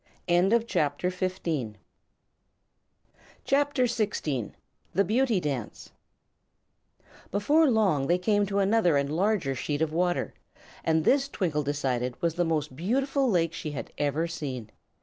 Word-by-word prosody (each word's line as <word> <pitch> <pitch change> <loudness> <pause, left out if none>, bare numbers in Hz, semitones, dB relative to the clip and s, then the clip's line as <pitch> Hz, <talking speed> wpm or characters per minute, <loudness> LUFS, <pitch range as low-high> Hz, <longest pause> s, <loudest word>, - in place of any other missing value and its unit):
[CHAPTER 180 -4 +2
XVI] 175 - -2 1.7
The 230 - -1
Beauty 235 -2 +2
Dance 135 -9 -5 1.4
Before 290 - +3
long 195 - +2
they 175 - +3
came 205 +2 +1
to 200 0 -2
another 195 -5 +3
and 140 +2 -1
larger 190 -6 +1
sheet 145 +4 -2
of 155 -1 -2
water, 175 +1 0 0.5
and 160 -1 +1
this 275 0 +3
Twinkle 165 - -1
decided 130 -4 -2
was 170 -1 0
the 175 +1 0
most 155 -5 -1
beautiful 265 - 0
lake 170 -5 +1
she 155 -3 -5
had 140 - -6
ever 145 +3 0
seen. 130 -9 -5
175 Hz, 115 wpm, -27 LUFS, 145-215 Hz, 1.7 s, Before